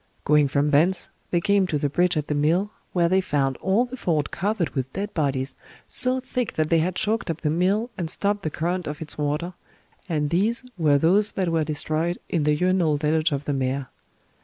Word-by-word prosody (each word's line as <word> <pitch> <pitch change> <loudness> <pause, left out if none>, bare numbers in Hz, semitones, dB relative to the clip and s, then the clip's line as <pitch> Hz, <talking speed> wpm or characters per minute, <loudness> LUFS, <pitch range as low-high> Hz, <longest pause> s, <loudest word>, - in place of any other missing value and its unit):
Going 150 -1 +4
from 140 +2 +1
thence, 170 +6 +2 0.2
they 175 - +1
came 200 +1 +2
to 155 - -1
the 145 - 0
bridge 175 +4 +1
at 150 - -1
the 150 - -2
mill, 165 +8 +1 0.2
where 175 -2 +2
they 190 +2 +3
found 140 -7 0
all 200 +6 +1
the 250 +1 -8
ford 160 - -1
covered 200 -3 -1
with 130 -2 -3
dead 205 +2 -4
bodies, 135 -4 -1 0.3
so 255 +1 +5
thick 250 -2 -3
that 155 0 -1
they 165 - +5
had 175 +3 -1
choked 215 0 0
up 165 0 -3
the 150 - 0
mill 195 +8 +1
and 170 -3 -2
stopped 205 +4 0
the 155 - -2
current 175 +4 -2
of 150 0 -5
its 160 - -6
water, 150 +5 -2 0.6
and 150 -3 -1
these 210 +9 +1
were 155 -5 +3
those 195 +8 +3
that 185 -3 -1
were 165 -1 +1
destroyed 155 +3 -1
in 170 - 0
the 150 0 +2
urinal 180 -2 +2
deluge 155 +2 +1
of 140 0 -3
the 145 - -1
mare. 130 0 -2
165 Hz, 210 wpm, -24 LUFS, 150-190 Hz, 0.6 s, so